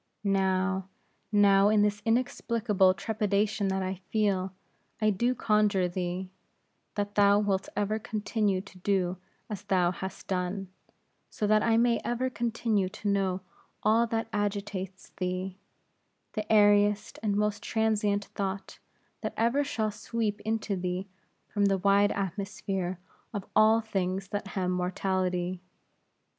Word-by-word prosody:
Now, 190 -1 +1 0.4
now, 200 -1 +5
in 210 -1 +4
this 210 0 0
inexplicable 225 -5 +2
trepidation 205 +1 0
that 190 0 0
I 185 0 -4
feel, 195 -4 +1 0.5
I 215 -1 +3
do 240 +6 +1
conjure 210 -5 +2
thee, 180 +1 -3 0.6
that 205 0 -2
thou 200 -1 +5
wilt 200 -2 0
ever 210 +1 0
continue 210 -2 -1
to 190 -2 -15
do 185 -1 0 0.3
as 205 -3 -5
thou 185 -4 +2
hast 190 +1 -7
done; 185 +1 -2 0.6
so 215 - -2
that 215 +1 +4
I 225 0 +3
may 235 0 +3
ever 250 +2 -1
continue 225 -4 0
to 205 +2 -4
know 190 -2 +1 0.4
all 225 +2 +4
that 225 0 -1
agitatest 200 -2 -3
thee, 185 +1 -3 0.7
the 215 0 -3
airiest 205 -1 +4
and 210 -2 0
most 210 0 0
transient 210 -2 +1
thought, 195 0 -4 0.4
that - - -4
ever 235 +6 +2
shall 220 -5 -1
sweep 215 0 -2
into 220 -1 -1
thee 180 +1 -3 0.4
from 205 -1 +1
the 195 -1 +3
wide 200 +2 +4
atmosphere 195 -1 -3 0.4
of 200 -1 -3
all 220 +1 +6
things 195 -3 -2
that 205 0 -3
hem 185 -2 -1
mortality. 180 0 -1
200 Hz, 130 wpm, -29 LUFS, 190-215 Hz, 0.7 s, all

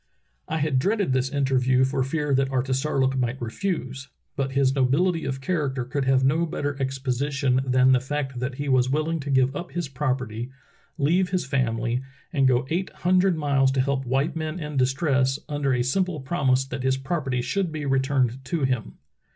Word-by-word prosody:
"I 160 - -2
had 150 -4 +1
dreaded 200 -1 +1
this 130 0 +1
interview 130 -2 +2
for 130 0 0
fear 150 +1 -1
that 135 0 +2
Artisar 135 +2 0
look 135 0 +2
might 130 0 -1
refuse, 135 - -3 0.3
but 135 -1 -2
his 135 -1 +3
nobility 155 +6 +1
of 135 0 -3
character 135 -5 -1
could 135 +2 -2
have 130 0 +3
no 155 +6 +2
better 145 -2 -3
exposition 135 0 0
than 130 0 +4
the 130 - +5
fact 135 -1 -3
that 125 +1 -3
he 145 +2 -4
was 130 -1 +3
willing 155 +4 0
to 140 0 -6
give 130 0 +2
up 175 +4 -6
his 175 -3 -2
property, 125 -4 -3 0.5
leave 175 +5 +2
his 185 -1 -1
family, 120 -2 0 0.3
and 135 -4 +3
go 125 0 +2
eight 180 +3 -1 0.2
hundred 185 -1 +4
miles 140 -3 +2
to 135 - 0
help 135 0 0
white 135 +5 0
men 155 +1 -3
in 150 -2 -5
distress, 135 0 +2
under 145 -2 -1
a 125 -1 +2
simple 180 +5 0
promise 135 -2 +1
that 135 - -5
his 130 0 +1
property 135 -3 -2
should 190 +4 -1
be 155 -2 -4
re 135 -1 +2
turned 130 -2 0
to 160 +1 -2
him." 130 -4 -1
135 Hz, 190 wpm, -25 LUFS, 130-150 Hz, 0.5 s, the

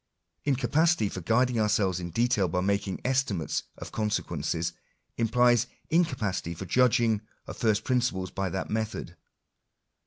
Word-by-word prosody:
In 140 -2 +3
capacity 160 - +2
for 95 - -6
guiding 120 +6 +2
ourselves 105 -4 +2
in 85 -1 -5
detail 110 -1 +1
hy 90 +3 0
making 100 0 -1
estimates 125 - 0
of - - -8
consequences, 85 -6 -1 0.4
implies 120 +1 +3 0.2
incapacity 115 - 0
for 95 - -6
judging 115 0 +3 0.2
of - - -8
first 110 -1 +1
principles 120 -8 0
by 95 -1 -2
that 95 +2 -4
method. 110 -5 -3
105 Hz, 130 wpm, -28 LUFS, 95-125 Hz, 0.4 s, In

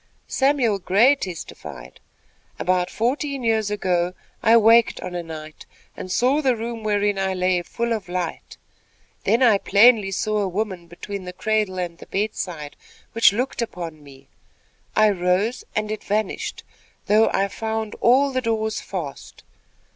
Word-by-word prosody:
Samuel 265 -7 +1
Gray 210 +9 +4
testified: 170 - -8 0.6
"About 180 0 +1
fourteen 270 +5 -2
years 220 -2 +1
ago, 180 -3 0 0.3
I 230 0 +6
waked 230 +1 +5
on 180 - -6
a 175 - -3
night, 155 -2 -10 0.3
and 185 - -7
saw 260 +9 +2
the 260 -4 +2
room 230 0 -5
wherein 205 -1 +1
I 190 -1 0
lay 180 -1 +1
full 235 +6 -2
of 210 -5 -5
light. 180 -2 -4 0.7
Then 235 +3 +3
I 220 -5 +5
plainly 210 0 +5
saw 215 +2 -1
a 200 - 0
woman, 185 -2 -3
between 190 +3 -7
the 180 - -7
cradle 215 -1 -1
and 175 -2 -4
the - - -12
bedside, 180 -7 -3 0.4
which 230 - +5
looked 245 +4 -2
upon 170 -8 -5
me. 135 -1 -16 0.7
I 215 -1 +5
rose, 190 +5 0
and 215 0 -1
it 215 - -5
vanished, 210 0 -2 0.4
though 215 +2 +4
I 195 +1 +1
found 220 +1 -4
all 270 +4 +4
the 255 -1 -1
doors 220 -2 -1
fast. 165 -8 -7
205 Hz, 150 wpm, -22 LUFS, 180-225 Hz, 0.7 s, I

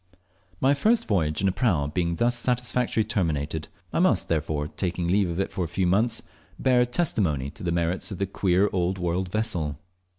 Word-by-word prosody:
My 135 +2 +4
first 220 +11 +2
voyage 80 -7 +1
in 100 - +2
a - - +3
prau 90 - +1
being 85 +2 -1
thus 120 +7 +2
satisfactorily 125 -2 0
terminated, 80 -7 -1 0.3
I - - +1
must, - - +2
before 75 -2 -1
taking 90 0 -3
leave 95 +1 +2
of 85 +2 -3
it 95 - -1
for 90 -3 -2
some 90 +2 0
months, 115 +5 +2 0.3
bear 125 -2 +3
testimony 95 - 0
to - - -13
the 85 - -1
merits 85 +2 0
of 95 - -5
the 100 - 0
queer 95 0 +2
old 90 0 0
world 90 +1 -1
vessel. 90 -9 -2
95 Hz, 185 wpm, -26 LUFS, 85-110 Hz, 0.3 s, My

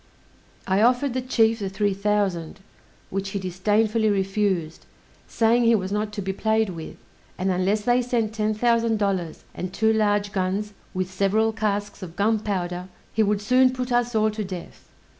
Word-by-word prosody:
I 190 +2 +2
offered 245 +3 +3
the 255 - -1
chief 230 -3 +2
the 195 -2 -3
three 200 +1 0
thousand, 195 -4 -1 0.5
which 195 0 -2
he 200 - -3
disdainfully 210 +4 +1
refused, 195 -4 -1 0.4
saying 235 +1 +2
he 230 0 +5
was 190 -2 -2
not 210 +1 -1
to 205 -2 -4
be 190 +1 -2
played 220 0 +1
with; 165 -2 -8 0.4
and 190 +1 0
unless 190 +4 +1
they 245 +3 +2
sent 235 -3 -1
ten 215 -1 0
thousand 230 0 +2
dollars, 190 -5 -2
and 185 0 -5
two 220 +3 +2
large 205 -2 +1
guns, 200 +2 -2 0.2
with 185 0 -2
several 210 +4 +2
casks 205 -2 -2
of 175 -2 -8
gunpowder, 195 -4 -1 0.3
he 220 - +2
would 205 -1 +1
soon 255 +4 +5
put 255 -1 -4
us 240 -1 +1
all 215 0 +3
to 215 0 -4
death. 185 -3 -9
210 Hz, 170 wpm, -24 LUFS, 190-220 Hz, 0.5 s, he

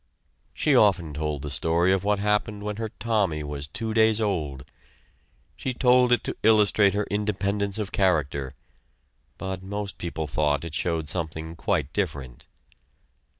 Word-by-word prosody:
She 150 -3 +2
often 90 -9 +3
told 75 -1 -3
the 75 - -4
story 80 +6 +2
of 95 -1 0
what 105 0 +2
happened 105 0 0
when 105 0 -4
her 110 -1 -3
Tommy 100 -10 0
was 75 -1 -5
two 110 +9 -3
days 110 -1 +4
old. 75 - -2 0.9
She 130 -1 -4
told 125 -1 +4
it 120 - +3
to - - -3
illustrate 105 -2 +4
her 105 0 0
independence 100 -1 -1
of 105 -3 -3
character, 75 -8 0 0.8
but 95 -1 -5
most 100 +1 -5
people 80 -2 -3
thought 75 +1 0
it 85 - -7
showed 80 0 -1
something 80 0 -4
quite 75 -3 -1
different. 70 -11 -4
95 Hz, 150 wpm, -25 LUFS, 75-105 Hz, 0.9 s, days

